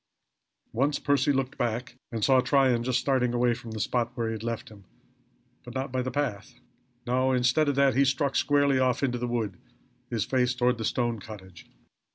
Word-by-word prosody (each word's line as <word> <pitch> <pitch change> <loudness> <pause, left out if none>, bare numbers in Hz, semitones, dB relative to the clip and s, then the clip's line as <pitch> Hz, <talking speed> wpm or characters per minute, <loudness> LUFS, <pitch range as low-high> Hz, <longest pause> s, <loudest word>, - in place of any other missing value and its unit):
Once 140 +5 +1
Percy 145 0 +2
looked 135 -1 -2
back 120 +1 -2 0.2
and 115 -3 -1
saw 130 -1 +5
Tryon 130 -2 +3
just 125 0 +1
starting 125 -3 +1
away 120 0 +3
from 115 -1 -9
the 110 -1 -6
spot 120 +2 0
where 115 -1 -1
he 110 - -3
left 115 +1 -5
him, 100 -3 -15 0.8
but 125 0 -11
not 130 0 -3
by 130 0 -1
the 130 - -3
path. 125 -3 -3 0.5
No, 130 +2 +1
instead 125 +4 +2
of 140 - 0
that 140 -1 +4
he 140 - +4
struck 135 +1 0
squarely 145 -2 +3
off 130 +1 +1
into 125 -3 0
the 125 - -2
wood, 110 -6 -3 0.5
his 115 -4 -1
face 125 -1 +1
toward 125 -1 +1
the 110 - -2
stone 120 -1 -1
cottage. 95 -4 -12
125 Hz, 195 wpm, -27 LUFS, 115-135 Hz, 0.8 s, saw